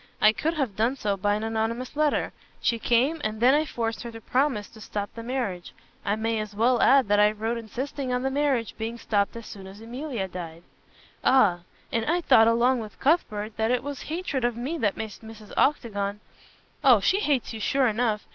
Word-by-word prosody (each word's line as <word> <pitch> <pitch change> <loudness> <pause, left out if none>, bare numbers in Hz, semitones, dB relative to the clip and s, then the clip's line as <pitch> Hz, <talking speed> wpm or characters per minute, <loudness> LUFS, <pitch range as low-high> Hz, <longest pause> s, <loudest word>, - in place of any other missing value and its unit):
I 215 0 +6
could 320 +7 -1
have 265 -10 -1
done 230 +5 +1
so 210 -6 -1
by 205 +2 +1
an 215 - -3
anonymous 225 +3 -2
letter. 300 0 +1 0.3
She 230 - 0
came 260 +8 +2
and 215 0 -2
then 250 +3 +5
I 305 +2 +3
forced 225 -5 -3
her 235 - -6
to 225 - -8
promise 250 -3 0
to 220 - -15
stop 205 -1 -5
the 230 - -7
marriage. 230 -8 -3 0.3
I 200 - 0
may 225 0 -1
as 210 -1 -6
well 240 +3 +3
add 270 -4 +5
that 205 0 +3
I 210 0 +6
wrote 220 +2 -2
insisting 255 +4 -4
on 250 0 0
the 265 - 0
marriage 270 -5 0
being 225 +2 -3
stopped 205 -1 0
as 230 -1 -8
soon 195 -2 -10
as 195 +2 -11
Emilia 240 -2 -4
died." 170 -2 -8 0.6
"Ah! 210 -10 +4 0.3
And 230 - 0
I 340 +3 +2
thought 255 -9 +5
along 240 +2 +3
with 215 -2 -9
Cuthbert 220 -9 0
that 220 0 +1
it 250 0 +1
was 285 -1 -5
hatred 315 -5 -3
of 240 -1 0
me 285 +8 -3
that 205 -6 0
made 220 -1 -4
Mrs. 220 -2 -12
Octagon 205 -7 0 0.3
" - - -33
"Oh, 255 -6 +7
she 375 - +2
hates 285 - 0
you 220 - -6
sure 270 +5 +2
enough. 220 -2 0
230 Hz, 215 wpm, -26 LUFS, 215-265 Hz, 0.6 s, Oh